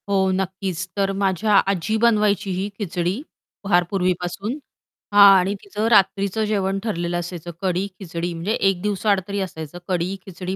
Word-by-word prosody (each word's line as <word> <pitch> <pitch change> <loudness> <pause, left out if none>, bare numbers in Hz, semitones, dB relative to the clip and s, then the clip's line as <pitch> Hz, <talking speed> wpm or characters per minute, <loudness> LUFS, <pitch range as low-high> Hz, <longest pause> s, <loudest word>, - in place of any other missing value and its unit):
हो, 190 -1 +2
नक्कीच. 190 -1 -3
तर 195 -1 +1
माझ्या 195 +2 +1 0.2
आजी 195 +3 -1
बनवायची 210 -3 +2
ही 190 +3 -2
खिचडी 180 +2 -2 0.4
फार 180 -3 +3
पूर्वीपासून, 185 +3 -1 0.6
हां, 200 -1 +9
आणि 190 +2 0
तिचं 210 +2 -2
रात्रीचं 195 +1 +3
जेवण 195 -2 0
ठरलेलं 175 -5 -2
असायचं, 175 -1 -6
कढी-खिचडी 180 -2 -3
म्हणजे 170 +6 -2 0.2
1 185 -2 -2
दिवसाआड 205 0 +1
तरी 200 0 -3
असायचं, 160 -3 -6
कढी, 180 +1 -1
खिचडी, 185 0 -5
190 Hz, 140 wpm, -22 LUFS, 180-200 Hz, 0.6 s, हां